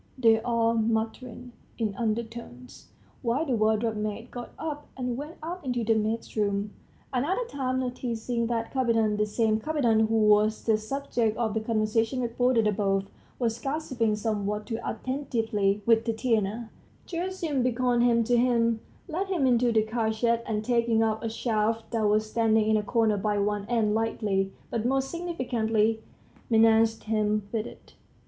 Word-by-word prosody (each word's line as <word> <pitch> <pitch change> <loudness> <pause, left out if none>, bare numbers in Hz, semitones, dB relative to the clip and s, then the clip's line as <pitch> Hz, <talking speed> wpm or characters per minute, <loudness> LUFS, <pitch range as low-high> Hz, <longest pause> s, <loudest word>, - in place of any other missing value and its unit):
they 225 -3 +4
all 230 -1 +1
muttered 230 +2 -2 0.3
in 220 -3 -1
undertones, 220 - -5 0.3
while 255 +6 0
the 275 - -3
wardrobe 220 +1 +1
maid 215 +3 -4
got 245 -1 -7
up 300 -2 -5
and 250 -2 -2
went 295 +5 -7
out 350 +3 -5
into 245 -3 -1
the 225 +1 +3
maid's 220 +1 -2
room. 205 -1 0 0.4
Another 330 - 0
time, 260 - -2
noticing 240 -2 -2
that 230 -1 -2
Kapiton 225 -5 +2
the 210 - +2
same 215 0 +1
Kapiton 235 -6 +2
who 225 - 0
was 215 0 +3
the 225 - +3
subject 230 -2 -1
of 225 -3 0
the 220 - 0
conversation 225 +2 0
reported 240 -1 +2
above 195 -2 +1 0.3
was 230 -2 -1
gossiping 260 -7 -1
somewhat 210 -1 -2
too 225 0 -4
attentively 225 -6 -1
with 230 -1 +4
Tatiana, 225 -1 -1 0.3
Gerasim 340 -5 -2
beckoned 245 0 +1
him 235 -1 +4
to 245 +2 +2
him, 235 -2 +2 0.3
led 365 +4 -2
him 355 -8 +1
into 245 -1 +3
the 220 -1 +3
cartshed, 225 +1 0
and 215 -1 -2
taking 235 -2 +2
up 220 -1 0
a 225 - -1
shaft 225 0 -1
that 225 -3 +1
was 215 +1 +2
standing 220 -1 +2
in 220 - +3
a - - +1
corner 220 -1 +1
by 205 +1 0
one 205 0 -1
end, 225 -3 +1
lightly, 210 -3 0 0.2
but 230 - -1
most 270 +2 0
significantly, 230 -10 0 0.5
menaced 225 0 +4
him 215 -1 0
with 225 -1 -2
it. - - -14
225 Hz, 155 wpm, -27 LUFS, 215-245 Hz, 0.5 s, they